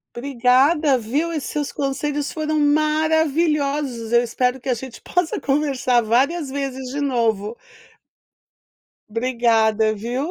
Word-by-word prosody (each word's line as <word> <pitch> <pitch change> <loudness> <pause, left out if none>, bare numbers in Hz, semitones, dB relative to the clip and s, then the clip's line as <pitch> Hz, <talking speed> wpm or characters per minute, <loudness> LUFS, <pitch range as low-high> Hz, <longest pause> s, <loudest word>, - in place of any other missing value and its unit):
Obrigada 270 +3 +2
viu, 285 +10 -2
e 310 - -2
seus 290 +2 -4
conselhos 285 +1 -2
foram 310 -1 -1
maravilhoso. 300 -4 +1
Eu 235 - +5
espero 250 +2 -1
que 255 - -8
a 255 - +2
gente 245 0 -9
possa 355 -3 -1
conversar 270 -4 +1
várias 270 +7 +1
vezes 265 -2 -4
de 285 - -3
novo. 230 -5 0 1.5
Obrigada 225 -2 +2
viu. 245 +9 -3
270 Hz, 115 wpm, -21 LUFS, 240-300 Hz, 1.5 s, Eu